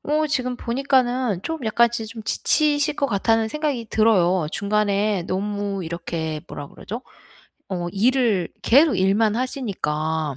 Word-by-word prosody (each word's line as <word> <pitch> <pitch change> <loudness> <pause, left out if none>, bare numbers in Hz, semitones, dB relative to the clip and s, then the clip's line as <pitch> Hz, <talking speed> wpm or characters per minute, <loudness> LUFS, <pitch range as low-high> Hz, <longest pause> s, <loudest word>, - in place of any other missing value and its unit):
어 305 +1 +1
지금 255 -4 -1
보니까는 250 -5 0
좀 325 0 -3
약간 235 +1 +3
지 225 -2 -4
좀 225 0 -9
지치실 295 +5 +2
것 280 - +1
같다는 225 +1 +1
생각이 290 -4 -2
들어요. 185 -6 +3
중간에 200 -1 0
너무 200 0 -3
이렇게 160 -2 -4
뭐라 145 - -7
그러죠? 230 +6 -8 0.7
어 175 -2 -3
일을 225 -4 +2
계속 285 +5 +5
일만 205 +3 +2
하시니까. 160 - -2
220 Hz, 285 characters per minute, -22 LUFS, 190-255 Hz, 0.7 s, 계속